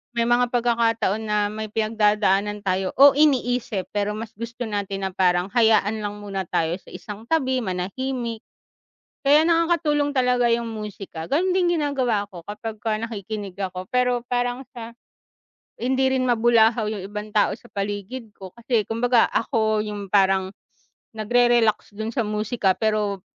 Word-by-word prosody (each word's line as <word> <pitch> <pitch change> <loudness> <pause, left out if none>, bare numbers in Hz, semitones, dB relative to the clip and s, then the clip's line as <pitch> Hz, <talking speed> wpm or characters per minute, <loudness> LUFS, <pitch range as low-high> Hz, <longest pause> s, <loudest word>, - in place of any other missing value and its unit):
May 235 0 +1
mga 240 +1 +3
pagkakataon 230 -3 +1
na 210 -1 +1
may 215 0 -4
pinagdadaanan 210 -2 +1
tayo, 185 0 0
o 280 0 +9
iniisip 250 -8 +1
pero 205 0 0
mas 225 0 -7
gusto 230 +3 -6
natin 200 -2 -3
na - - -12
parang 180 -1 +2
hayaan 220 -2 +3
lang 205 0 -4
muna 195 -2 -4
tayo 160 0 0
sa - - -17
isang 210 +1 -9
tabi, 260 -5 +1
manahimik. 230 +5 -3 0.8
Kaya 295 +3 +6
nakakatulong 325 -4 +2
talaga 250 -1 +3
yung 235 0 -1
musika, 200 -6 -7
ganun 355 +6 +1
din 355 -2 +2
ginagawa 255 -8 0
ko 175 -3 -9
kapagka 215 +1 -4
nakikinig 210 -3 -5
ako 185 -1 -4
pero 250 -1 +1
parang 245 +1 -1
sa 230 -1 -8 0.9
hindi 265 +2 +1
rin 255 -1 +1
mabulahaw 225 -2 +3
yung 210 -3 -5
ibang 210 +1 -7
tao 210 - +2
sa - - -16
paligid 205 +3 -5
ko, 190 -1 -10
kasi 235 -1 0
kumbaga 235 +1 +3
ako 220 -3 +1
yung 205 -2 -6
parang 190 -1 +3 0.6
nagre-relax 235 0 +2
dun 220 +1 -3
sa 240 - +1
musika 210 -1 0
pero 210 -3 0
220 Hz, 145 wpm, -23 LUFS, 205-245 Hz, 0.9 s, o